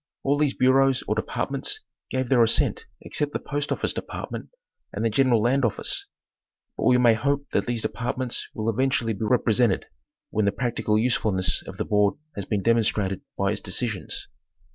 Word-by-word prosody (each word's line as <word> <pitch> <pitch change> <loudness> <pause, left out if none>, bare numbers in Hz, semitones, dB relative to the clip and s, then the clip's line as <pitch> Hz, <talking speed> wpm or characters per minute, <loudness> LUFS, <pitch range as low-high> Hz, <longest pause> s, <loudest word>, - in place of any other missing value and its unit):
All 140 +1 +2
these 150 -2 +2
bureaus 135 +1 +4
or - - +2
departments - - -2 0.3
gave 130 -1 -1
their 125 -3 +5
assent 115 -1 +2 0.2
except 145 -1 -2
the - - -1
Post 145 0 -3
Office - - 0
Department - - -6 0.4
and 105 +3 -2
the 115 - +2
General 120 -2 +3
Land 130 +3 +2
Office; 115 - 0 0.7
but - - -2
we 125 - +6
may 120 -2 +6
hope 140 +5 0
that - - 0
these 120 -2 -1
departments 120 +3 -2
will 110 0 -3
eventually 120 0 +1
be 110 +2 -3
rep 125 +3 +2
resented, 115 -3 +2 0.5
when 110 -1 +1
the 100 - +3
practical 115 -3 0
usefulness 110 -5 +1
of - - -8
the - - -2
board 105 -1 +2 0.2
has 100 - -4
been 100 -1 -1
demonstrated 105 -4 +2 0.2
by 100 0 +1
its 105 - -3
decisions. 105 0 -3
115 Hz, 175 wpm, -25 LUFS, 105-130 Hz, 0.7 s, we